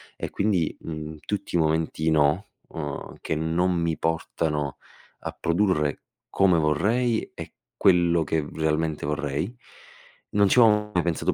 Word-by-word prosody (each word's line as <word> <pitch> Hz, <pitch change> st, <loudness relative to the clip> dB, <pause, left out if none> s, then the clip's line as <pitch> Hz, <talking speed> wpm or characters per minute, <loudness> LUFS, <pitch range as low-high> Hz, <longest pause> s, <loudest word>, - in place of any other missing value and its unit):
e -, -, -5 dB
quindi, 100 Hz, -6 st, 0 dB
mhmm, 80 Hz, -1 st, -6 dB
tutti 105 Hz, -3 st, -3 dB
i 85 Hz, -, +4 dB
momenti 80 Hz, 0 st, +1 dB
"no", 75 Hz, +6 st, +2 dB, 0.2 s
uhm, 75 Hz, -3 st, -6 dB
che -, -, -3 dB
non 85 Hz, +4 st, +1 dB
mi 85 Hz, -2 st, 0 dB
portano 80 Hz, -3 st, -1 dB, 0.4 s
a -, -, -4 dB
produrre 85 Hz, -5 st, 0 dB, 0.3 s
come 90 Hz, -4 st, +3 dB
vorrei 110 Hz, +10 st, +1 dB
e -, -, -9 dB, 0.2 s
quello 85 Hz, -3 st, +4 dB
che 80 Hz, -1 st, -1 dB
realmente 80 Hz, -1 st, -1 dB
vorrei. 75 Hz, -, -2 dB, 0.8 s
Non 100 Hz, -1 st, +4 dB
ci 125 Hz, -, +5 dB
avevo 105 Hz, -2 st, +4 dB
mai 90 Hz, -, +2 dB
pensato 85 Hz, -2 st, 0 dB
80 Hz, 140 wpm, -25 LUFS, 75-95 Hz, 0.8 s, ci